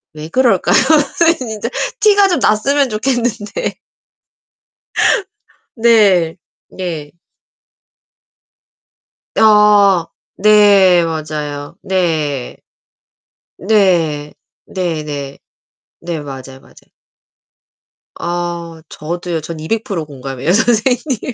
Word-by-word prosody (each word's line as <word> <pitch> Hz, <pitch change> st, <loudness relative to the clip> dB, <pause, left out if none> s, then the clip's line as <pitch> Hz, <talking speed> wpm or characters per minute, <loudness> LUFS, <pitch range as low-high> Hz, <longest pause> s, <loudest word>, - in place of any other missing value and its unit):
왜 155 Hz, 0 st, -8 dB
그럴까요? 255 Hz, +6 st, +2 dB, 0.5 s
아니 330 Hz, +1 st, +4 dB
진짜 225 Hz, -2 st, -5 dB, 0.3 s
티가 410 Hz, -2 st, +5 dB
좀 355 Hz, -, +1 dB
났으면 270 Hz, +6 st, +2 dB
좋겠는데. 235 Hz, -, -2 dB, 2.0 s
네. 205 Hz, -8 st, +3 dB, 0.3 s
네. 165 Hz, -6 st, -6 dB, 2.2 s
아. 210 Hz, -4 st, +5 dB, 0.4 s
네 200 Hz, -4 st, +5 dB
맞아요. 150 Hz, -3 st, -5 dB
네. 155 Hz, -8 st, -2 dB, 1.0 s
네. 170 Hz, -7 st, +1 dB, 0.3 s
네네. 150 Hz, -6 st, -4 dB, 0.6 s
네 170 Hz, -2 st, -5 dB
맞아요, 135 Hz, -2 st, -9 dB
맞아요. -, -, -21 dB, 1.3 s
아 170 Hz, -1 st, -5 dB
저도요. 170 Hz, +1 st, -5 dB
저는 160 Hz, +1 st, -7 dB
200% 195 Hz, -1 st, -3 dB
공감해요 135 Hz, +1 st, -4 dB
선생님. 240 Hz, +4 st, 0 dB
180 Hz, 140 characters per minute, -15 LUFS, 155-220 Hz, 2.2 s, 티가